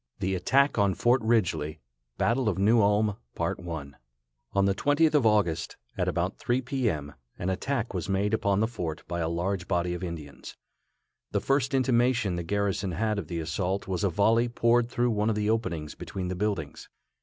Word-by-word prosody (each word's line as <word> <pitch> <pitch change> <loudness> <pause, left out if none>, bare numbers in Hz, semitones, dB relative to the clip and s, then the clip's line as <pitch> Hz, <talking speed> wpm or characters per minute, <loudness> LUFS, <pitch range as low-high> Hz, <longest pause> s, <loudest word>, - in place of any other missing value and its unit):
THE 95 +1 -1
ATTACK 135 +8 +2
ON 100 -2 +3
FORT 120 +1 +3
RIDGELY. 90 -9 0 0.4
On - - +2
the 105 -2 +3 1.6
20th 145 +7 +3
of 145 -6 +3
August, 85 -6 +1 0.2
at - - -1
about - - -1
3 125 +2 0
p. 130 -1 0
m., 75 -5 -4 0.2
an 90 +2 -1
attack 120 +4 -2
was 90 +1 -3
made 100 +2 +1
upon 100 -2 +2
the 110 - +2
fort 85 -9 -5
by 85 - -3
a 80 -1 0
large 90 +2 -2
body 90 -1 0
of 90 - -5
Indians. 75 -6 -7 0.7
The - - 0
first 135 0 +1
intimation 120 -6 +2
the 85 - -2
garrison 100 +1 -1
had 110 +3 0
of 85 - -6
the 85 +1 -3
assault 90 +4 -2
was 95 0 -2
a 100 - +3
volley 115 +6 +3
poured 120 0 +2
through 120 0 +1
one 105 0 +1
of 110 - +1
the 105 0 +1
openings 85 -9 -2
between 95 -2 -5
the 90 - -2
buildings. 95 -6 -3
100 Hz, 170 wpm, -28 LUFS, 90-115 Hz, 1.6 s, ON